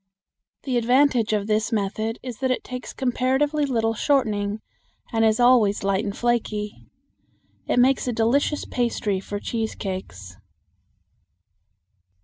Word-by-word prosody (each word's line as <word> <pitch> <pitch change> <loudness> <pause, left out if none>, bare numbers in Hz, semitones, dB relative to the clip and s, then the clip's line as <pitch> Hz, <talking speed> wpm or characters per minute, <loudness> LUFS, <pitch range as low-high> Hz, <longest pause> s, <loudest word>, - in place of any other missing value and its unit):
The 255 -3 -1
advantage 245 -1 +3
of 210 -2 0
this 215 +2 0
method 220 +2 -1
is 250 -3 -7
that 265 -1 0
it 255 - -1
takes 250 -1 -7
comparatively 265 +3 0
little 225 -3 0
shortening 215 -5 0 0.5
and 225 0 +2
is 220 +1 +3
always 240 -5 +4
light 195 +1 +1
and 200 -2 -4
flaky. 215 -3 -2 0.8
It - - 0
makes 255 +1 +3
a - - +1
delicious 245 +6 +1
pastry 225 -5 -1
for 205 +1 -5
cheese 225 +1 -3
cakes. 95 - -6
225 Hz, 130 wpm, -23 LUFS, 210-255 Hz, 0.8 s, always